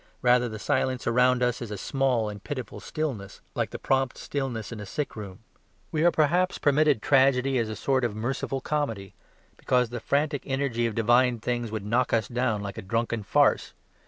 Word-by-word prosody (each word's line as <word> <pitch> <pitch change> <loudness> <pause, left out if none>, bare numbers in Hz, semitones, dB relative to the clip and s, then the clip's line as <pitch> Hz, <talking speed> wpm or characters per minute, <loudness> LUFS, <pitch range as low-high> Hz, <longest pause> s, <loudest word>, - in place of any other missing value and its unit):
Rather 125 0 +4
the 110 - -6
silence 130 +1 -1
around 125 +1 +3
us 125 0 0
is 120 - -5
a 105 - -5
small 125 +1 0
and 105 -1 -7
pitiful 130 -5 -5
stillness 120 -11 -4
like - - -1
the - - -6
prompt 135 -1 0
stillness 130 -7 -4
in 115 - -6
a 105 - -6
sick 150 +8 -3
room. 105 0 -9 0.5
We 155 0 0
are 175 - +7
perhaps 175 +4 +2
permitted 145 -4 +3
tragedy 135 -1 +3
as 115 -2 -1
a 110 - -4
sort 130 +1 0
of 115 -4 -1
merciful 135 +4 -2
comedy: 115 -11 -2 0.4
because 125 -2 +1
the 120 0 -5
frantic 145 +3 0
energy 135 -4 0
of 110 - -5
divine 120 +2 +3
things 120 +1 -2
would 110 -2 -4
knock 120 +4 +1
us 110 -3 +2
down 120 -4 -1
like 100 -1 -6
a - - -5
drunken 115 +3 -1
farce. 100 - +2
125 Hz, 190 wpm, -27 LUFS, 110-135 Hz, 0.5 s, are